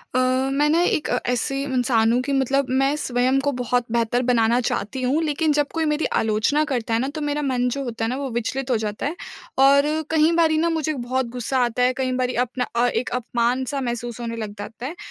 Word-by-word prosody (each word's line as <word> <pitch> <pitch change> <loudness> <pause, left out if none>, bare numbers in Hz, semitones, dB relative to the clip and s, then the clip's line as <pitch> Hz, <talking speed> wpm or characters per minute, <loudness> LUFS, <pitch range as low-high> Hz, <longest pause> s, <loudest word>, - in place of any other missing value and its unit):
अ, - - +4 0.3
मैं 290 +2 +2
ना 330 +2 +3
एक 315 -3 +1
अ, 245 - +1
ऐसे 260 +3 -1
इंसान 245 -4 +2
हूँ 245 - +2
कि 280 - -3
मतलब 270 0 +1
मैं 270 +2 +2
स्वयं 255 -1 +1
को 285 +1 0
बहुत 245 0 0
बेहतर 235 +1 +1
बनाना 235 0 +3
चाहती 235 +2 -2
हूँ। 265 +5 +1
लेकिन, 310 0 +1
जब 295 -1 +1
कोई 325 -1 0
मेरी 300 +1 0 0.2
आलोचना 220 +8 +1
करता 235 -3 -1
है 225 - +2
ना 260 - -1
तो 310 - -4
मेरा 295 0 -1
मन 255 -3 0
जो 275 +3 -3
होता 230 -3 -3
है - - -1
ना 250 - -2
वो 275 -1 -3
विचलित 260 +3 -3
हो 240 - +3
जाता 210 +1 -4
है। 295 +4 -2 0.4
और 275 +1 +6 0.3
कई 315 0 +4
बारी 315 -1 +3
ना 335 +2 +2
मुझे 315 -2 -1
बहुत 260 -1 -2
गुस्सा 255 +2 -1
आता 240 +1 -1
है, 250 +1 +3
कई 260 0 -2
बारी 250 0 0
अपना 250 +1 -3
अ, 240 +1 +3
एक 245 0 -1
अपमान-सा 250 +3 -1
महसूस 240 -1 -4
होने 230 -1 -4
लग 215 -3 -5
जाता 225 +4 -7
है। 305 +6 -5
255 Hz, 230 wpm, -22 LUFS, 240-280 Hz, 0.4 s, और